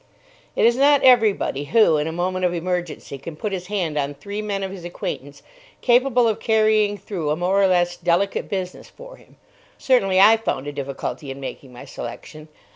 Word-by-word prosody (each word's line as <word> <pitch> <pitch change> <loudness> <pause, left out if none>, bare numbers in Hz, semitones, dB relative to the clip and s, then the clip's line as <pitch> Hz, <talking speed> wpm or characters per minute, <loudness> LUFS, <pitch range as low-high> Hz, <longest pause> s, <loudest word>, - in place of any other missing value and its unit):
It - - +2
is 235 +1 +4
not 285 +1 +4
everybody 220 - +3
who, 215 -3 +4
in 150 +1 -1
a - - -3
moment 185 +2 -2
of 175 -1 +1
emergency, 175 -5 -4
can 155 +4 -8
put 205 +7 -4
his 180 -2 -5
hand 175 -7 -2
on 140 0 -3
three 200 +9 -6
men 200 -2 -3
of 190 - -4
his 190 -3 -9
acquaintance 145 -4 -6 0.4
capable 245 -1 +3
of 220 - -1
carrying 215 -2 +2
through 175 -8 -4
a 150 - +1
more 185 +4 +1
or 195 - +5
less 175 -1 +1
delicate 175 +3 0
business 185 -2 -5
for - - -13
him. - - -22 0.4
Certainly 195 -8 +2
I 215 +3 +7
found 145 -11 -3
a 145 - -4
difficulty 140 0 -5
in 135 +1 -7
making 135 -1 -8
my 125 - -11
selection. 150 +6 -9
185 Hz, 195 wpm, -22 LUFS, 155-215 Hz, 0.4 s, I